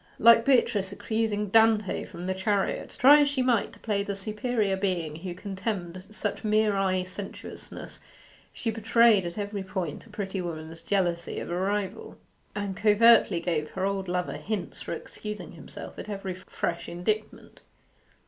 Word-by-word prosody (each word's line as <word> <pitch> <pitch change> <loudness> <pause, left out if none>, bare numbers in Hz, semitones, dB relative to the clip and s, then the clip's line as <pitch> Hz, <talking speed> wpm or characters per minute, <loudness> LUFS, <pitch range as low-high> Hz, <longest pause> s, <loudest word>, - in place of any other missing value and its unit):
Like 230 0 +7
Beatrice 210 -7 +3
accusing 210 0 -1
Dante 220 -1 +3
from 175 -1 -8
the 190 - 0
chariot, 195 +1 -1
try 285 +4 +8
as 285 - +3
she 275 -2 0
might 240 -4 +2
to - - -15
play 205 -3 0
the 200 0 -3
superior 210 0 0
being 180 -6 -2
who 175 +1 -6
contemned 185 -2 -4
such 210 -1 -3
mere 215 -1 +3
eye 190 -1 +1
sensuousness, 185 +2 -7 0.5
she 230 - -2
betrayed 225 -3 +4
at 170 - -7
every 205 -1 -3
point 185 -1 -4
a - - -18
pretty 200 -2 -4
woman's 165 -1 -6
jealousy 175 -4 0
of - - -6
a - - -1
rival, 200 +3 -2 0.4
and 200 -2 -3
covertly 215 -2 +5
gave 160 -3 -1
her 190 0 -2
old 195 -1 -1
lover 180 0 -2
hints 205 -4 -4
for - - -6
excusing 210 0 -6
himself - - -10
at - - -7
each 195 -3 -4
fresh 170 0 -3
indictment. 210 +5 -3
200 Hz, 160 wpm, -27 LUFS, 185-215 Hz, 0.5 s, try